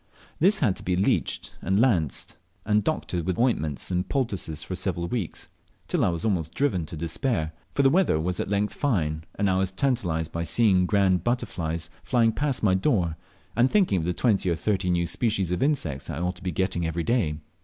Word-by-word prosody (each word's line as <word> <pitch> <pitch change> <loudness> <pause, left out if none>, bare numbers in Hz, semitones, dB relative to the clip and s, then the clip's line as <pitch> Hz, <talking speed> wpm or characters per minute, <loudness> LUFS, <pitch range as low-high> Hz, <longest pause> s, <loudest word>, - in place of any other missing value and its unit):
This 195 +6 +4
had 105 -10 +3
to - - -8
be 90 - 0
leeched, 95 +3 0
and 95 +3 +1
lanced, 95 - +1 0.3
and 105 -1 +2
doctored 90 - -1
with 90 +1 -2
ointments 80 - 0
and 90 +1 -1
poultices 100 - -2
for 95 - -6
several 85 -2 -1
weeks, 105 -5 -4 0.4
till - - +1
I - - +3
was 85 +1 -3
almost 85 -7 -1
driven 95 - 0
to 80 - -7
despair, 80 - -1 0.2
for 140 - +3
the 135 - +6
weather 180 - +3
was 90 +2 -2
at - - -2
length 100 +1 0
fine, 80 - -1
and 100 - +1
I 95 -1 +2
was 95 -1 +1
tantalized 95 - -1
by 85 - -3
seeing 95 0 +3
grand 95 -4 +2
butterflies 85 -9 -2
flying 115 -3 +2
past 140 +1 -1
my 100 -3 +4
door, 95 - +1 0.4
and 120 +3 +4
thinking 185 - +3
of 80 - -3
the 90 - +1
twenty 100 -3 +1
or 85 - +2
thirty 95 +2 0
new 85 -1 +2
species 100 -3 0
of 90 - -1
insects 110 - 0
that 80 - -4
I - - -3
ought 90 0 -2
to - - -14
be 90 - -1
getting 95 0 -1
every 85 +1 -2
day. 90 -9 +1
95 Hz, 210 wpm, -26 LUFS, 85-115 Hz, 0.4 s, the